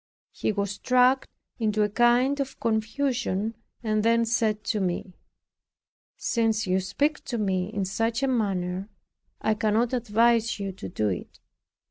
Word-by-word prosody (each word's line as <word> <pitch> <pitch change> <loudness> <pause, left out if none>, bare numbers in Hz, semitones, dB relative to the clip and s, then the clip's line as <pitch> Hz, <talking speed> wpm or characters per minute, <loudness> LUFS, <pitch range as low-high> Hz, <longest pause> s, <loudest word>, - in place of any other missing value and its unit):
He - - -1
was 200 -1 -1
struck 250 +5 +3 0.3
into 215 -1 +1
a 210 - +1
kind 240 +5 +3
of 270 -1 -4
confusion; 225 -2 -1 0.3
and 215 -1 +1
then 230 +1 +3
said 220 -2 0
to 210 - -1
me, 185 0 -2 1.0
"Since 225 -2 +1
you 185 0 +2
speak 285 +11 -1
to 240 - -3
me 190 -4 0
in 200 -3 -2
such 225 +6 -1
a - - +3
manner, 195 -5 -1 0.5
I 220 - +2
cannot 220 +3 +1
advise 230 -1 +2
you 195 -1 -3
to 175 - -3
it. 90 - -6
220 Hz, 140 wpm, -26 LUFS, 200-240 Hz, 1.0 s, struck